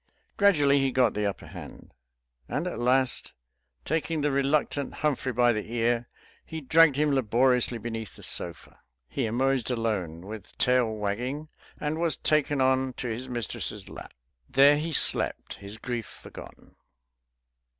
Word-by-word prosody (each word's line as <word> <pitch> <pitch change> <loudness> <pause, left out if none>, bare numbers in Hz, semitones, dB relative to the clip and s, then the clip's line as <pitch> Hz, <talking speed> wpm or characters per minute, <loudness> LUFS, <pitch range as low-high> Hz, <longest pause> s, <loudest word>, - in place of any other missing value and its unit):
Gradually 145 -9 +4
he 135 -1 +1
got 125 -3 +3
the 105 0 0
upper 100 - -5
hand; - - -11 0.6
and 155 - -2
at 180 - -4
last, 130 +1 +1 0.5
taking 160 0 -1
the 145 0 +1
reluctant 140 +1 0
Humphrey 145 -3 0
by 120 0 +3
the 110 +1 -4
ear, 120 0 0 0.3
he 160 - -6
dragged 155 +1 +5
him 150 +1 +2
laboriously 125 0 +2
beneath 115 -1 -6
the - - -13
sofa. 85 -2 -2 0.3
He 125 - -2
emerged 130 +2 +1
alone, 105 -9 -2
with 105 -1 -9
tail 125 -3 +3
wagging, 120 +9 -3 0.3
and 150 +2 -2
was 170 -2 +1
taken 150 -2 +1
on 130 0 +2
to 120 - -4
his 125 +3 -4
mistress's 120 -3 -4
lap. - - -10 0.3
There 140 +2 +6
he 165 +2 -3
slept, - - 0
his 100 +2 -9
grief 120 -1 -4
forgotten. - - -13
130 Hz, 145 wpm, -27 LUFS, 115-145 Hz, 0.6 s, There